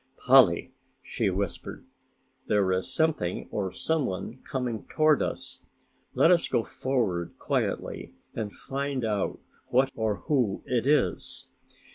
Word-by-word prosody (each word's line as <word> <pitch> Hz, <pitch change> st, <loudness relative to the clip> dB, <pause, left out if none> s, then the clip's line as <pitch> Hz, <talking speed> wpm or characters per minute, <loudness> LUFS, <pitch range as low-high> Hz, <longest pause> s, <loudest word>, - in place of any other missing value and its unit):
"Polly," -, -, +5 dB, 0.3 s
she -, -, -1 dB
whispered, 95 Hz, 0 st, -4 dB, 0.6 s
"there 100 Hz, -3 st, +2 dB
is 95 Hz, +7 st, 0 dB
something 150 Hz, -, 0 dB
or 95 Hz, -3 st, -2 dB
someone 125 Hz, -, -2 dB
coming 125 Hz, -6 st, -4 dB
toward 155 Hz, -1 st, +3 dB
us; -, -, -4 dB, 0.5 s
let 165 Hz, -, +5 dB
us 175 Hz, -2 st, +4 dB
go 115 Hz, -, +1 dB
forward 110 Hz, -13 st, -2 dB
quietly -, -, -2 dB, 0.2 s
and 105 Hz, -2 st, -4 dB
find 135 Hz, -1 st, -3 dB
out 105 Hz, -3 st, -1 dB, 0.3 s
what 135 Hz, +2 st, +3 dB
or 110 Hz, -2 st, -1 dB
who 125 Hz, -10 st, 0 dB
it 125 Hz, 0 st, 0 dB
is." 150 Hz, +1 st, 0 dB
120 Hz, 120 wpm, -27 LUFS, 100-140 Hz, 0.6 s, Polly